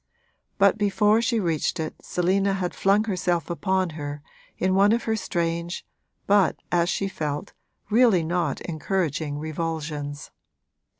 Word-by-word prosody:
But 200 Hz, +1 st, +4 dB
before 210 Hz, +2 st, +3 dB
she 235 Hz, -1 st, +1 dB
reached 165 Hz, -6 st, 0 dB
it 160 Hz, -1 st, -3 dB
Selina 195 Hz, +3 st, +1 dB
had 185 Hz, -2 st, -2 dB
flung 200 Hz, +2 st, +3 dB
herself 180 Hz, -6 st, -1 dB
upon 185 Hz, 0 st, 0 dB
her 145 Hz, -1 st, -6 dB, 0.3 s
in 185 Hz, 0 st, +1 dB
one 200 Hz, +3 st, +5 dB
of 235 Hz, -, 0 dB
her 225 Hz, -, 0 dB
strange 170 Hz, -3 st, -2 dB, 0.4 s
but, 200 Hz, -3 st, +4 dB, 0.2 s
as 175 Hz, 0 st, +2 dB
she 195 Hz, -, 0 dB
felt, 150 Hz, -1 st, -4 dB, 0.4 s
really 220 Hz, -6 st, +5 dB
not 165 Hz, -3 st, -1 dB
encouraging 155 Hz, -3 st, -2 dB
revulsions. 155 Hz, -2 st, -4 dB
175 Hz, 130 wpm, -25 LUFS, 160-200 Hz, 0.4 s, one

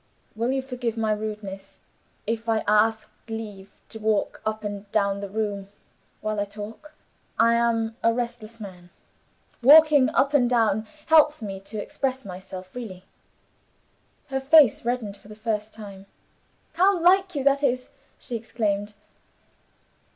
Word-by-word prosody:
"Will 230 Hz, +3 st, 0 dB
you 265 Hz, 0 st, -1 dB
forgive 245 Hz, -3 st, -4 dB
my 220 Hz, -1 st, 0 dB
rudeness, 210 Hz, -2 st, -5 dB, 0.5 s
if 225 Hz, +1 st, -3 dB
I 225 Hz, -1 st, +1 dB
ask 215 Hz, +1 st, +3 dB, 0.2 s
leave 210 Hz, -3 st, -7 dB, 0.2 s
to 220 Hz, -, -9 dB
walk 215 Hz, -1 st, 0 dB
up 215 Hz, 0 st, -2 dB
and 205 Hz, -1 st, -6 dB
down 200 Hz, -2 st, +1 dB
the 200 Hz, -1 st, -6 dB
room 205 Hz, -1 st, -3 dB, 0.5 s
while 215 Hz, -1 st, -2 dB
I 205 Hz, -, 0 dB
talk? 215 Hz, +9 st, -10 dB, 0.4 s
I 230 Hz, +1 st, +5 dB
am 230 Hz, -1 st, +1 dB
a 230 Hz, -, +4 dB
restless 235 Hz, -1 st, -5 dB
man. 180 Hz, -4 st, -10 dB, 0.7 s
Walking 290 Hz, 0 st, +7 dB
up 280 Hz, -1 st, +1 dB
and 250 Hz, -4 st, +4 dB
down 220 Hz, -3 st, +2 dB, 0.2 s
helps 305 Hz, -4 st, +4 dB
me 195 Hz, -2 st, -5 dB
to 205 Hz, +2 st, -7 dB
express 260 Hz, +4 st, -3 dB
myself 185 Hz, 0 st, -8 dB
freely." 190 Hz, -5 st, -8 dB, 1.3 s
Her 270 Hz, -, -1 dB
f 270 Hz, +2 st, -8 dB
ace 285 Hz, -9 st, +7 dB
brightened 230 Hz, -4 st, -3 dB
for 200 Hz, -, -19 dB
the 215 Hz, -, -11 dB
first 215 Hz, -1 st, -3 dB
time. 200 Hz, -3 st, -11 dB, 0.7 s
"How 375 Hz, +3 st, +4 dB
like 365 Hz, +1 st, +4 dB
You 280 Hz, -, -1 dB
that 280 Hz, 0 st, +3 dB
is!" 255 Hz, -2 st, 0 dB, 0.3 s
she 240 Hz, -, -7 dB
exclaimed. 210 Hz, -2 st, -2 dB
220 Hz, 145 wpm, -25 LUFS, 205-250 Hz, 1.3 s, Walking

